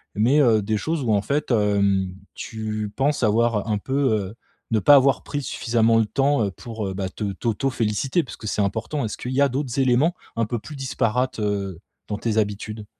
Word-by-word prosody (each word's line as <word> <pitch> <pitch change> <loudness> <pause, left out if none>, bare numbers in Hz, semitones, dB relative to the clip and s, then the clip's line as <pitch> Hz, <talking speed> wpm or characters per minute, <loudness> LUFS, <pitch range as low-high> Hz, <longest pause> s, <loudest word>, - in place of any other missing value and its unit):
mais 120 +8 +3
heu, 110 -5 +4
des 110 +2 -1
choses 160 +8 -2
où 115 - 0
en 100 - +3
fait, 145 +5 -1
hem, 100 -4 +2 0.2
tu 110 -2 -4
penses 140 -1 +1
avoir 110 0 +2
un 105 - +1
peu, 135 +6 -4 0.2
heu, 105 0 -2 0.4
ne 115 - +3
pas 145 +9 +6
avoir 135 -1 +4
pris 145 0 -4
suffisamment 115 -2 +2
le 110 - +3
temps, 140 +1 +1
heu, 100 - -2
pour, 110 +1 -6
heu, 95 - -4
bah, 95 -1 -3
te 100 0 -4
t'auto 115 +6 -1
féliciter, 130 - 0
puisque 110 -4 -9
c'est 105 - 0
important. 110 +8 -2
Est-ce 105 - -5
qu'il 125 - -5
y 140 - +2
a 140 - +4
d'autres 135 0 -2
éléments, 130 +6 +3 0.2
un 115 - +2
peu 120 +2 -3
plus 150 +7 -10
disparates, 125 -2 -1
heu, 100 -4 -2 0.3
dans 105 - -3
tes 110 -2 -1
habitudes? 105 0 -2
115 Hz, 210 wpm, -23 LUFS, 105-130 Hz, 0.4 s, pas